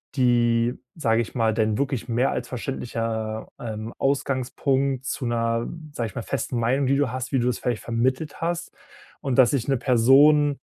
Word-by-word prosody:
die, 120 -2 +2 0.2
sag' 115 -8 +1
ich 115 - -3
mal 115 -2 +2
dein 110 -1 +1
wirklich 135 -4 -1
mehr 120 +3 +2
als 125 - -3
verständlicher, 115 -3 -3
ähm, 110 -1 -5
Ausgangspunkt 135 0 0
zu 140 - -3
'ner, 115 0 0 0.3
sag' 115 -4 -2
ich - - -17
mal, 125 - -3
festen 125 -2 -2
Meinung, 130 +4 +1
die 140 - +3
du 140 -3 +1
hast, 130 +1 -4
wie 135 - +3
du 120 - +1
das 125 - 0
vielleicht 120 -3 -2
vermittelt 130 +6 -1
hast. 170 0 -2 0.5
Und 135 -3 -1
dass 125 -2 +7
sich 135 -3 -1
'ne 135 - +2
Person 140 +4 +5
125 Hz, 180 wpm, -24 LUFS, 115-135 Hz, 0.5 s, dass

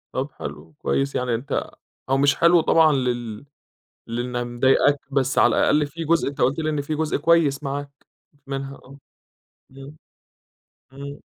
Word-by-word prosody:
طَب - - -3
حلو، 80 +2 -9
كويس 135 0 -1
يعني 125 -2 0
أنت 130 +4 -3 0.4
هو 135 - +3
مش 140 +1 +3
حلو 170 0 +5
طبعًا 160 0 +4
لل 120 -3 -2 0.6
لإنّها 120 +1 -3
مضايقاك، 130 +4 +3 0.2
بس 135 -1 0
على - - +4
الأقل 150 0 +3
في 165 +3 -7
جزء 165 +1 +2
أنت 140 0 -7
قُلت 135 +5 +2
لي 155 -1 -1
إن 150 -2 -1
في 155 +2 -3
جزء 155 0 -1
كويس 155 -2 +2
معاك 140 0 -4 0.4
بت 145 - -32
منها، 135 0 -5
آه. 135 +1 -15 0.7
إمم، 135 +2 -12 1.0
إمم. 140 +1 -9
140 Hz, 160 wpm, -23 LUFS, 130-150 Hz, 1.0 s, حلو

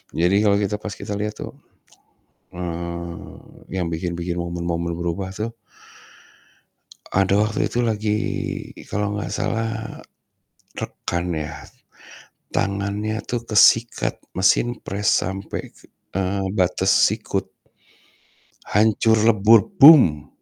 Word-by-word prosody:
Jadi 90 +4 +2
kalau 100 -1 +4
kita 105 0 -1
pas 105 -1 -6
kita 100 +1 -8
lihat 105 0 -3
tuh, - - -7 1.0
eee, 85 -1 -6 0.4
yang 90 -2 -1
bikin-bikin 85 +1 -3
momen-momen 85 -1 -3
berubah 85 +3 -3
tuh 115 +2 -4 1.6
ada 95 +1 +2
waktu 110 0 -1
itu 120 - -3
lagi 105 -1 0 0.7
kalau 105 0 -2
enggak 105 - -4
salah, 110 -1 -3 0.8
rekan 85 +1 -4
ya. 75 0 -5 0.9
Tangannya 100 +2 -2
tuh 120 -1 -2
kesikat 115 +2 +3 0.2
mesin 105 +6 +2
pres 105 +3 -1
sampai 95 +2 -5
ke - - -19 0.3
eee, 95 +1 -1
batas 90 -1 +1 0.2
sikut. - - -1 1.2
Hancur 110 +1 +3
lebur, 110 0 +6 0.2
"Boom!" 105 - +8
100 Hz, 105 wpm, -22 LUFS, 85-110 Hz, 1.6 s, Boom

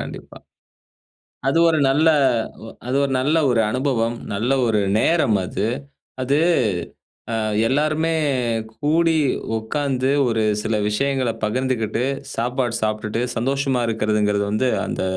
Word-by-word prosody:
கண்டிப்பா. - - -8 1.1
அது 140 - +2
ஒரு 160 -1 +2
நல்ல 150 +4 +3 0.6
ஒ - - -8 0.2
அது 130 +2 0
ஒரு 140 - -1
நல்ல 150 +5 +2
ஒரு 115 -2 +3
அனுபவம். 125 -3 0 0.2
நல்ல 110 +6 -1 0.2
ஒரு 110 -2 +2 0.2
நேரம் 135 -11 +2
அது. 95 +3 -2 0.6
அது 140 +3 +1 1.0
அ - - 0 0.3
எல்லாருமே 155 +5 +1 0.6
கூடி 160 +2 +2 0.4
உட்காந்து 130 +3 -1 0.2
ஒரு 115 -2 +1 0.2
சில 110 - -1
விஷயங்கள 135 +3 0
பகிர்ந்துகிட்டு, 115 0 -1 0.3
சாப்பாடு 120 0 -1
சாப்பிட்டுட்டு 110 +1 -2
சந்தோஷமா 135 +1 0
இருக்குறதுங்கறது 105 -2 +1
வந்து, 125 +5 +1 0.2
அந்த - - -3
125 Hz, 115 wpm, -21 LUFS, 110-140 Hz, 1.1 s, நல்ல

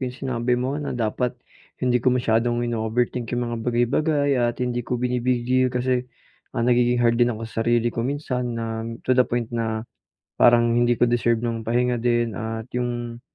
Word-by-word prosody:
yung 125 - -10
sinabi 125 -2 -1
mo 135 +4 -2
na 140 -3 -4
dapat 120 +2 -1 0.5
hindi 125 -1 +2
ko 130 - +2
masyadong 120 0 +1
ino-overthink 120 +1 -1
yung 120 -1 -2
mga - - -2
bagay-bagay 140 +5 +1
at 120 0 0
hindi 120 0 -1
ko 125 - -1
bini-big 125 0 0
deal 130 +1 +2
kasi, 125 0 -1 0.5
ah, 115 - +1
nagiging 120 0 +3
hard 115 +1 +3
din 120 - +5
ako 115 - -6
sarili 115 +1 0
ko - - -3
minsan 125 -2 -2
na, 115 - -3 0.4
to 130 - +2
the 125 0 +3
point 120 -1 -2
na 110 -1 -2 0.6
parang 120 -1 +5
hindi 120 0 +3
ko 120 - +3
deserve 120 -1 +1
ng 115 -2 -3
pahinga 120 0 +1
din. 120 -1 +1
At 110 +2 -4
yung, 120 -1 -3
120 Hz, 180 wpm, -23 LUFS, 115-125 Hz, 0.6 s, din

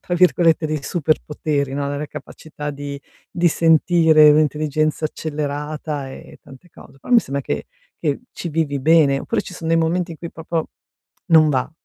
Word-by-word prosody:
tra 175 - -3
virgolette, 170 -2 +3
dei 155 -2 -3
"superpoteri," 150 -3 -1
no, 140 0 -2
la 145 - -3
la 150 +1 -4
capacità 150 +1 -8
di 140 0 -7 0.3
di 175 0 +2
sentire 160 -1 +5
un'intelligenza 155 +1 +1
accelerata 150 -1 -4
e - - -13
tante 135 +7 -16
cose. 135 - -17
Però 135 - -12
mi 240 -2 +7
sembra 140 -4 -4
che 75 - -4 0.3
che 145 -3 -1
ci 175 - -6
vivi 150 -3 -1
bene. 150 -2 +4
Oppure 230 - -2
ci 180 - -10
son 165 -2 -6
dei 165 - +3
momenti 170 +2 0
in 160 - -12
cui 170 - -7
proprio 160 0 -4 0.6
non 160 -2 +6
va? 130 +1 -1
155 Hz, 170 wpm, -20 LUFS, 145-165 Hz, 0.6 s, mi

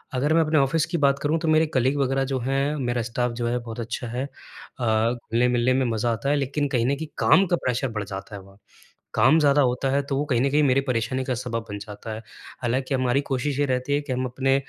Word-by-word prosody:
अगर 145 +5 +1
मैं 165 - +5
अपने 155 0 +1
ऑफिस 145 +4 +2
की 170 +1 -2
बात 140 -2 +2
करूँ 155 +3 +1
तो 165 - -3
मेरे 155 +1 +4
कलीग 130 +3 +2
वगैरह 135 0 +1
जो 130 - 0
हैं 135 +4 0
मेरा 120 -3 -1
स्टाफ 120 +1 -1
जो 120 - 0
है 120 +1 0
बहुत 115 -1 -8
अच्छा 115 +1 -4
है 125 +3 -3
अ, 115 -4 -2
घुलने-मिलने 120 +1 +1
में 130 0 +1
मज़ा 115 +1 0
आता 125 +5 -3
है 145 - +3
लेकिन 145 +1 -1
कहीं 120 -4 +1
न 140 - +2
कहीं 160 +3 -6
काम 195 - +5
का 175 - +2
प्रेशर 130 +1 0
बढ़ 105 -2 -3
जाता 95 +1 -7
है 100 - -8
वहाँ। 95 +1 -18 0.6
काम 130 +9 +5
ज़्यादा 145 -1 +4
होता 130 +1 +1
है 140 +1 +2
तो 135 - 0
वो 145 - 0
कहीं 125 -5 +1
न 140 - +2
कहीं 150 +1 +3
मेरे 135 -1 +3
परेशानी 125 +2 -1
का 130 - -1
सबब 115 -2 -4
बन 105 - -4
जाता 105 +2 -8
है, 110 - -5 0.4
हालाँकि 130 +3 0
हमारी 130 +1 +1
कोशिश 135 0 -2
ये 145 - +3
रहती 130 +2 -1
है 145 - +1
कि 145 -3 -4
हम 130 +1 -1
अपने 135 +2 +1
130 Hz, 255 wpm, -24 LUFS, 120-140 Hz, 0.6 s, मैं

